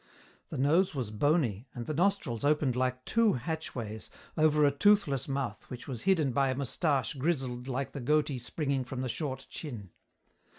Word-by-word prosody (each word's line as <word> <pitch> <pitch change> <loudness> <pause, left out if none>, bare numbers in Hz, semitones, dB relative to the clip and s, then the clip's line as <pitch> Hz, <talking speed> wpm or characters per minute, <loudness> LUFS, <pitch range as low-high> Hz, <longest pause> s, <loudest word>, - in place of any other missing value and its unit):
The - - -5
nose 160 +7 +3
was 125 -6 -3
bony, 130 - +1
and 120 -1 -5
the 155 - -2
nostrils 170 - 0
opened 145 -3 +2
like 130 0 -1
two 230 -2 +3
hatchways, 120 -6 -4 0.3
over 150 -1 +4
a 140 - +4
toothless 145 - +3
mouth 135 -6 -3
which 125 - -8
was 125 -5 -5
hidden 160 -7 +2
by 135 +1 +2
a 130 - 0
moustache 140 -1 0
grizzled 130 -4 -1
like 135 +1 -2
the 140 - -6
goatee 150 0 +1
springing 135 +2 -1
from 130 0 -5
the 130 - -2
short 135 0 -3
chin. 115 - -7
135 Hz, 170 wpm, -30 LUFS, 125-155 Hz, 0.3 s, over